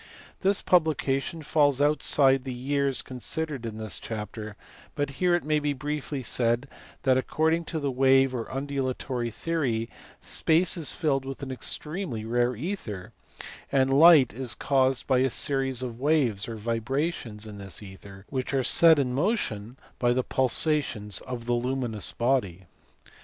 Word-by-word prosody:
This 195 +1 +1
publication 155 -2 +1
falls 145 -2 +2
outside 145 -2 +3
the 130 - -5
years 140 +1 0
con 130 -1 -9
sidered 150 -4 -3
in 110 -1 -7
this 110 -3 -3
chapter, 110 -1 -6 0.4
but 145 -2 -1
here 180 -1 +4
it 175 - -1
may 150 0 +1
be 145 -1 -1
briefly 145 0 -4
said 120 +3 0 0.4
that 130 -1 +4
according 160 +5 0
to 160 - -3
the 140 -2 -1
wave 135 0 +4
or 115 -3 -4
undulatory 130 -3 -3
theory 120 -4 -2 0.3
space 165 +3 +1
is 165 -5 -2
filled 140 -5 0
with 135 +1 -7
an 135 - -5
extremely 150 - -3
rare 120 +2 +1
ether, 110 - -5 0.6
and 135 -1 +2
light 150 - +7
is 125 -1 -6
caused 130 -2 +1
by 130 -2 +2
a 130 +1 +2
series 135 -1 0
of 120 -2 -6
waves 130 -8 +1
or 115 - -5
vibrations 115 +1 -3
in 105 -2 -9
this 100 +1 -6
ether 95 0 -12
which 130 0 -2
are 135 - +2
set 165 +5 +7
in 130 -3 0
motion 130 - -1 0.2
by 120 -1 +3
the 130 +1 0
pulsations 130 -6 0
of 120 -2 -5
the 120 - 0
luminous 120 -3 0
body. 115 -8 -1
130 Hz, 155 wpm, -27 LUFS, 120-145 Hz, 0.6 s, light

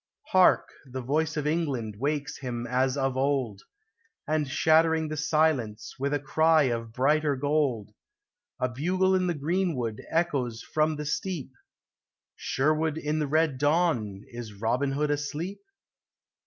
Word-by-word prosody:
Hark, - - +4 0.2
the 130 0 -6
voice 155 +5 0
of 150 - -1
England 140 -9 -1
wakes 145 +2 -2
him 120 -3 -4
as 130 +2 +1
of 135 -1 0
old, 130 -6 0 0.7
And, 155 -1 0
shattering 160 +2 +3
the 155 - -3
silence 150 -8 0
with 140 +1 -1
a 145 - +1
cry 160 +3 +3
of 115 -3 -2
brighter 145 +4 +2
gold, 140 -6 0 0.7
A 125 - +1
bugle 180 +9 +1
in 185 -1 +2
the 175 - 0
greenwood 150 - -1
echoes 135 -9 -1
from 155 0 0
the 150 0 -5
steep, 150 -2 -3 0.8
Sherwood 155 +2 0
in 155 0 -1
the 150 - 0
red 155 -2 +1
dawn, 145 - +1
is 120 -3 -8
Robin 125 +5 0
Hood 145 +1 0
asleep 150 +6 -3
145 Hz, 140 wpm, -27 LUFS, 130-155 Hz, 0.8 s, Hark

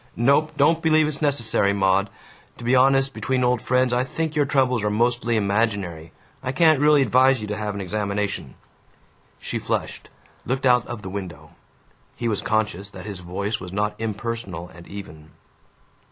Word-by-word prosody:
"Nope. 140 +6 +2
Don't 160 +4 +3
believe 155 -1 +3
it's 150 0 -5
necessary, 115 -8 +2
Maud. 100 0 +2 0.5
To - - -11
be 120 +2 +2
honest, 135 +1 +4
between 125 +4 -1
old 125 -2 +2
friends, 125 -1 +1
I 125 +1 +2
think 160 +4 -3
your 145 -2 +2
troubles 130 -5 +1
are 105 - +1
mostly 120 +1 +1
imaginary. 100 -6 -1 0.3
I 125 - -2
can't 155 +1 +4
really 150 -1 +5
advise 130 +2 +4
you 105 - -5
to 105 - -2
have 105 -1 -4
an 100 - -4
examination." 100 - -3 0.8
She - - -4
flushed, - - -3 0.3
looked 130 +2 -2
out 125 -2 +4
of 120 -3 -7
the 95 - -6
window. 85 -6 -7 0.6
He 120 - -3
was 105 -3 -1
conscious 105 -3 -1
that 95 -2 -10
his 100 -4 -6
voice 100 +5 -3
was 90 - -8
not 105 +2 -1
impersonal 110 -5 -4
and 85 0 -13
even. 80 -6 -10
115 Hz, 170 wpm, -23 LUFS, 100-130 Hz, 0.8 s, really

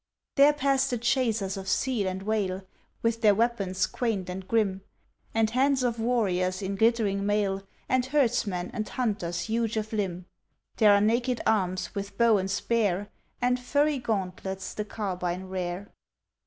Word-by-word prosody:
There 285 +1 +7
pass 275 -2 +1
the 245 - -1
chasers 225 -5 0
of 190 0 -5
seal 240 -6 +1
and 190 +1 -3
whale, 195 -3 -1 0.4
With 230 0 +1
their 210 -3 +5
weapons 200 -5 +1
quaint 200 -7 -2
and 185 +1 -7
grim, 200 -4 +1 0.5
And 225 -1 +1
bands 265 +1 +3
of 235 -2 0
warriors 195 -5 0
in 195 +1 -2
glittering 215 -2 +2
mail, 200 -1 +1 0.3
And 255 0 +1
herdsmen 230 -10 +1
and 215 - -3
hunters 190 -8 -2
huge 225 +4 -1
of 215 +1 -3
limb. 185 -4 -2 0.5
There 215 -3 +6
are 200 0 +5
naked 235 +3 +1
arms, 185 -4 0
with 200 0 -5
bow 230 -3 +5
and 190 0 -2
spear, 205 -1 0 0.3
And 250 0 +2
furry 285 +3 +1
gauntlets 190 -4 -3
the 210 - -3
carbine 185 -4 -3
rear. 185 +1 -4
210 Hz, 155 wpm, -27 LUFS, 190-235 Hz, 0.5 s, There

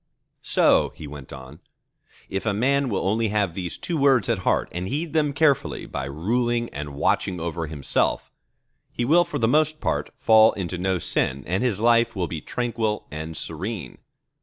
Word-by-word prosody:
"So," - - +3
he 80 - -9
went 70 -2 -10
on, 65 +3 -10 0.7
"if 95 +3 -4
a 100 - +1
man 135 +4 +2
will 95 -3 -1
only 110 +3 +1
have 100 -4 0
these 90 -2 -5
two 170 -3 -3
words 135 -4 +3
at 115 -4 +1
heart, 95 - +1
and 90 +1 -4
heed 150 - -3
them 150 -2 +2
carefully 145 -1 +1
by 65 - -5
ruling 120 - -1
and 75 -1 -7
watching 90 +5 0
over 85 0 -3
himself, 75 -3 -1 0.6
he 120 - -2
will 170 +7 +5
for 170 - -4
the 115 - +2
most 155 +4 +2
part - - -1
fall 110 0 +6
into 90 -2 -4
no 95 0 0
sin, 70 -4 0
and 90 +4 -1
his 120 -6 0
life 115 0 +3
will 90 -2 -1
be 80 -2 -5
tranquil 115 -3 -2
and 80 +1 -6
serene." 90 - -5
105 Hz, 180 wpm, -24 LUFS, 85-120 Hz, 0.7 s, fall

